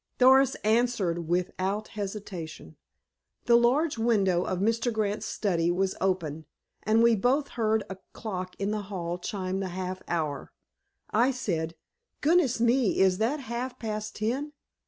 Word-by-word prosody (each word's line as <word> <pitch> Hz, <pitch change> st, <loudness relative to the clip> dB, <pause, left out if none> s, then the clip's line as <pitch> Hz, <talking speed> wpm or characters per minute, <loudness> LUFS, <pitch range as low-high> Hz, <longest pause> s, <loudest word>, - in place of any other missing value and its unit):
Doris 265 Hz, +1 st, +6 dB
answered 215 Hz, -7 st, +1 dB
without 185 Hz, +4 st, -1 dB
hesitation: 200 Hz, -5 st, -6 dB, 0.7 s
"The 235 Hz, -, +5 dB
large 250 Hz, +4 st, +3 dB
window 195 Hz, -6 st, +2 dB
of 185 Hz, -, -2 dB
Mr. 230 Hz, +5 st, +1 dB
Grant's 215 Hz, -2 st, -1 dB
study 170 Hz, -5 st, 0 dB
was 185 Hz, +2 st, +1 dB
open, 160 Hz, -5 st, -1 dB, 0.3 s
and 220 Hz, +2 st, +3 dB
we 235 Hz, -1 st, +5 dB
both 265 Hz, +7 st, +1 dB
heard 220 Hz, -2 st, 0 dB
a 190 Hz, -, -7 dB
clock 185 Hz, -4 st, -5 dB
in 200 Hz, +1 st, -1 dB
the 215 Hz, -1 st, -1 dB
hall 175 Hz, -3 st, -3 dB
chime 190 Hz, -1 st, -3 dB
the 195 Hz, -, -2 dB
half 185 Hz, +1 st, -4 dB
hour. 155 Hz, -5 st, -2 dB, 0.6 s
I 235 Hz, +4 st, +4 dB
said, 170 Hz, -11 st, -2 dB, 0.5 s
'Goodness 305 Hz, -6 st, +3 dB
me, 240 Hz, -2 st, +2 dB
is 190 Hz, -1 st, +4 dB
that 260 Hz, +7 st, 0 dB
half 245 Hz, +1 st, -4 dB
past 215 Hz, -1 st, -4 dB
ten? 265 Hz, +8 st, -2 dB
210 Hz, 140 wpm, -28 LUFS, 185-235 Hz, 0.7 s, Doris